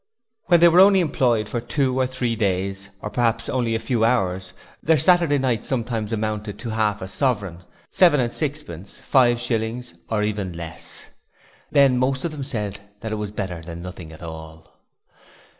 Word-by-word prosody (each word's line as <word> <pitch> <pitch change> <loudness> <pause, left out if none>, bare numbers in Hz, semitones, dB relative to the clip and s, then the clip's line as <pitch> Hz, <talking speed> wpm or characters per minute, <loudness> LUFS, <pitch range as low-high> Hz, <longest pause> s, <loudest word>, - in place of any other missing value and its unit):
When 175 -2 +5
they 170 - +9
were 170 +1 +5
only 195 0 +7
employed 120 - +1
for 120 +2 -3
two 130 +1 0
or 130 - +2
three 125 -2 -2
days 100 -2 -1
or 105 - -4
perhaps 115 -1 0
only 120 -3 0
a - - 0
few 115 0 0
hours, 95 -6 +1 0.3
their 160 0 +3
'Saturday 170 -1 +4
night' 130 -5 0
sometimes 115 -4 -2
amounted 105 -2 -3
to 115 +1 -5
half 105 -3 0
a - - -5
sovereign, 100 - -1 0.3
seven 170 -6 +5
and 120 -2 0
sixpence, 145 - -5
five 120 -3 +3
shillings 120 +1 -3 0.2
or 105 -2 0
even 100 -4 -2
less. 85 0 -7 0.6
Then 135 -3 +4
most 130 +2 0
of 170 - -1
them 150 -3 -5
said 105 -7 -4 0.2
that 110 -2 -4
it 110 - -2
was 105 - -3
better 95 -5 -4
than 85 +1 -8
nothing 90 -3 -8
at 80 +2 -12
all. 80 -1 -10
115 Hz, 175 wpm, -23 LUFS, 100-130 Hz, 0.6 s, they